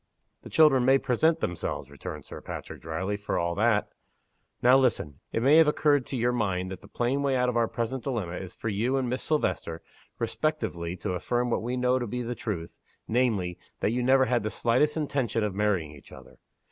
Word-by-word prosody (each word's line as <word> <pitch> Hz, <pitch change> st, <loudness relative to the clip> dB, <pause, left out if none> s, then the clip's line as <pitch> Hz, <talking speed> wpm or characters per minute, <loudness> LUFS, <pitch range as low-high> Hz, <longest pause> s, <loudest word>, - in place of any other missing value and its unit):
"The -, -, -11 dB
children 150 Hz, -5 st, +5 dB
may 135 Hz, +2 st, +5 dB
present 160 Hz, +6 st, +1 dB
themselves," 80 Hz, -5 st, -3 dB
returned 70 Hz, -, -7 dB
Sir -, -, -9 dB
Patrick, -, -, -8 dB
dryly, 95 Hz, +6 st, -3 dB
"for 105 Hz, -, -2 dB
all 85 Hz, 0 st, 0 dB
that. 105 Hz, +2 st, +2 dB, 0.7 s
Now 125 Hz, +2 st, +7 dB
listen. 120 Hz, -, +1 dB
It 115 Hz, -, -1 dB
may 145 Hz, +4 st, +6 dB
have 160 Hz, -1 st, +7 dB
occurred 145 Hz, -3 st, +2 dB
to 135 Hz, -, -3 dB
your 120 Hz, +1 st, +2 dB
mind 95 Hz, -6 st, -1 dB
that 95 Hz, -, -7 dB
the -, -, -14 dB
plain 125 Hz, +4 st, -1 dB
way 140 Hz, -2 st, +1 dB
out 125 Hz, 0 st, +2 dB
of 125 Hz, -, -2 dB
our 115 Hz, -1 st, +3 dB
present 120 Hz, +3 st, -3 dB
dilemma 105 Hz, -11 st, -3 dB
is 95 Hz, -2 st, -8 dB
for -, -, -6 dB
you 115 Hz, +6 st, 0 dB
and 130 Hz, -2 st, 0 dB
Miss 125 Hz, +2 st, -2 dB
Silvester, 90 Hz, -, -1 dB, 0.3 s
respectively, 90 Hz, -, -2 dB
to 90 Hz, -, -3 dB
affirm 120 Hz, +7 st, -1 dB
what -, -, +1 dB
we 120 Hz, +3 st, -2 dB
know 125 Hz, +1 st, +2 dB
to 120 Hz, -, -3 dB
be 125 Hz, +3 st, -3 dB
the 120 Hz, +1 st, -3 dB
truth 95 Hz, -9 st, -5 dB, 0.3 s
namely, 110 Hz, -8 st, 0 dB, 0.2 s
that -, -, +2 dB
you 125 Hz, +2 st, 0 dB
never 130 Hz, +1 st, +4 dB
had 125 Hz, -2 st, +1 dB
the 110 Hz, -, -2 dB
slightest 130 Hz, +8 st, +1 dB
intention 135 Hz, -7 st, -1 dB
of 105 Hz, -2 st, -1 dB
marrying 95 Hz, -6 st, 0 dB
each 75 Hz, -2 st, -15 dB
other. -, -, -14 dB
120 Hz, 210 wpm, -27 LUFS, 95-130 Hz, 0.7 s, Now